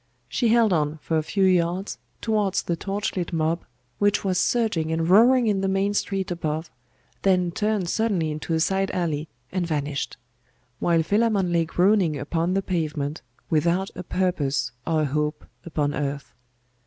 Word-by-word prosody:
She 240 - 0
held 225 -3 +4
on 150 -1 0
for 160 +1 -1
a - - 0
few 195 +5 -1
yards 180 +1 +1 0.2
towards 210 -3 +1
the 170 - -1
torch 200 +4 -3
lit 180 -2 -2
mob, 165 0 0 0.4
which 205 0 +2
was 185 -2 +1
surging 195 -11 +1
and 165 0 0
roaring 235 +7 +6
in 205 -3 +1
the 195 - 0
main 195 +1 +1
street 195 -2 -1
above, 160 -1 -3 0.5
then 180 -2 +2
turned 210 -1 0
suddenly 185 -6 0
into 155 +2 -2
a - - +1
side 195 +3 +1
alley, 160 -4 -1 0.2
and 180 -2 -1
vanished; 145 -5 -2 0.6
while 170 -2 +2
Philammon 205 -1 +1
lay 165 -1 +2
groaning 180 -2 +2
upon 165 +6 -1
the 195 - +1
pavement, 155 -4 -2 0.3
without 170 +5 +1
a 180 - -5
purpose 150 -8 -1 0.2
or 160 -2 +2
a - - +2
hope 150 +2 -2 0.2
upon 145 -3 -1
earth. 140 -4 -4
175 Hz, 165 wpm, -24 LUFS, 155-195 Hz, 0.6 s, roaring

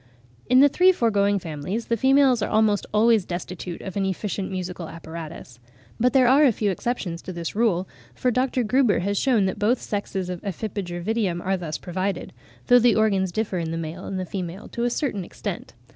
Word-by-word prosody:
In 255 +1 +6
the 285 - +8
three 360 +6 +5
foregoing 205 - +2
families, 175 +6 -4
the 230 - 0
females 265 0 +4
are - - -1
almost 215 -2 +2
always 220 -1 +4
destitute 175 0 -6
of 190 - -7
an 200 - 0
efficient 195 0 -2
musical 180 -3 -5
apparatus. 160 -6 -9 0.4
But 250 +2 +3
there 260 -2 +5
are 275 +4 +6
a 275 - +6
few 210 -2 0
exceptions 185 -5 -3
to - - -7
this 170 0 -5
rule, 200 -5 +1 0.3
for 250 - +1
Dr. 255 +1 +1
Gruber 240 -3 +2
has 200 +3 -1
shewn 240 -7 +3
that 190 - -2
both 230 +4 +2
sexes 195 -3 -3
of 180 -1 -5
Ephippiger 190 -3 -4
vitium 205 -4 0
are 190 +2 0
thus 165 -4 -4
provided; 185 +2 -3 0.3
though 245 -1 +6
the 235 -3 +4
organs 195 -4 +2
differ 200 -2 -2
in 165 -1 -3
the 165 - -3
male 165 +2 -6
and 185 -2 -4
female 185 +1 -5
to 235 - -2
a - - +2
certain 240 - -2
extent. 180 -5 -6
200 Hz, 195 wpm, -24 LUFS, 180-235 Hz, 0.4 s, the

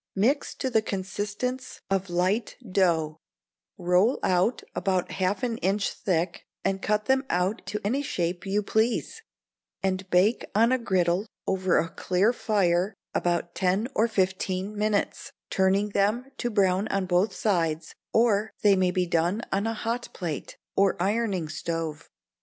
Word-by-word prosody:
Mix 250 +9 +1
to 260 - -2
the 220 -2 +4
consistence 205 +6 -4
of 195 -1 0
light 185 +6 0
dough, 165 -5 +1 0.6
roll 180 +7 +3
out 185 +6 +2
about 185 -2 0
half 190 +6 -1
an 235 -2 -1
inch 195 +2 0
thick, 170 -2 -2 0.2
and 195 0 0
cut 210 0 0
them 265 +2 +3
out 185 +5 0
to 210 - -2
any 255 +7 +1
shape 175 -9 -2
you 200 +2 0
please, 230 - 0 0.6
and 190 0 -1
bake 190 +6 +3
on 230 +3 +5
a 260 - +3
griddle 190 -2 +1 0.2
over 190 -1 +2
a 165 - +2
clear 185 +6 +1
fire 195 -4 +1 0.2
about 175 0 0
ten 190 +5 +1
or 225 - +3
fifteen 190 -1 -1
minutes; 210 -1 -1 0.2
turning 195 +2 +2
them 215 +7 0
to 240 - 0
brown 195 -2 +2
on 195 -1 0
both 180 +3 +2
sides 165 -6 0 0.2
or 220 -2 +3
they 205 -2 +6
may 185 -1 +2
be 180 0 +1
done 175 +6 0
on 200 +3 0
a 225 - -1
hot 230 +3 -3
plate, 165 -6 -5 0.2
or 195 -2 +3
ironing 200 -3 0
stove. 160 -1 -4
195 Hz, 150 wpm, -27 LUFS, 180-215 Hz, 0.6 s, they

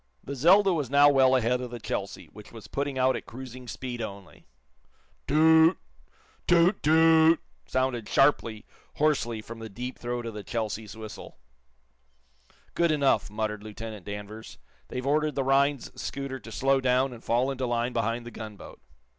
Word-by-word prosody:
The 140 - -6
"Zelda" 185 +8 +5
was 150 -6 -2
now 145 +1 +6
well 130 -1 +4
ahead 125 0 +1
of 125 - -5
the 120 0 -7
"Chelsea," - - -5
which - - -13
was - - -11
putting 140 -1 -3
out 130 0 +3
at - - -7
cruising 125 0 -9
speed 120 0 -6
only. 100 -3 -9 0.8
Too - - -2
oot! 160 +2 +6 0.7
toot! 175 +3 +4
toot! 160 +1 +5 0.3
sounded 130 -4 -1
sharply, 115 -6 +2 0.3
hoarsely, 120 -7 0
from 115 +1 -9
the 110 0 -7
deep 125 +6 -7
throat 120 0 -4
of 115 - -5
the 105 - -6
"Chelsea's" 110 -2 -4
whistle. 110 -1 -10 1.4
"Good 170 0 +2
enough," 140 -7 +2
muttered 105 0 -3
Lieutenant 110 -1 -8
Danvers. 105 +2 -8 0.3
"They've 125 +1 -5
ordered 150 +2 +1
the 135 - 0
Rhinds 140 0 +1
scooter 135 -1 -5
to 115 - -12
slow 135 +6 +1
clown 130 +1 +1
and 120 - -12
fall 125 +4 +1
into 130 -1 -3
line 120 +1 -1
behind 115 +1 -1
the 120 - -8
gunboat." 105 - -10
125 Hz, 165 wpm, -27 LUFS, 115-140 Hz, 1.4 s, now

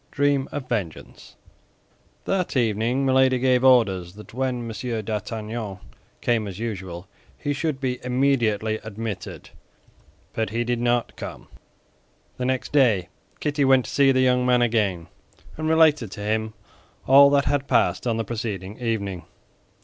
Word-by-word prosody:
DREAM 140 -1 +1
OF 140 -3 -5
VENGEANCE 100 -10 -5 0.9
That 180 -6 -1
evening 120 +3 +1
Milady 130 -1 +4
gave 125 0 +2
orders 100 -9 +3
that 105 +1 -13
when 125 -2 -2
M. 115 0 -4
d'Artagnan 110 -1 -4 0.4
came 115 -3 +1
as 95 -2 -7
usual, 95 -5 -6 0.3
he 145 - -2
should 145 -1 -2
be 125 -2 -3
immediately 120 -5 +1
admitted; 110 -2 -6 0.8
but 110 -2 -1
he 115 +3 -1
did 120 0 -2
not 120 0 0
come. - - -8 0.9
The 125 - -2
next 130 0 -2
day 110 -11 +3 0.3
Kitty 145 -1 0
went 130 -2 +4
to - - -7
see 140 -1 +4
the 130 -1 +2
young 125 -1 +3
man 125 -1 +3
again, 105 -8 0 0.5
and 155 0 -2
related 155 -7 +4
to 105 - -8
him 110 +1 -2 0.5
all 140 +1 +8
that 140 0 +2
had 140 -1 0
passed 95 -5 +1
on 115 -2 0
the 115 - -2
preceding 105 -3 -5
evening. 100 -7 -3
120 Hz, 145 wpm, -24 LUFS, 110-130 Hz, 0.9 s, all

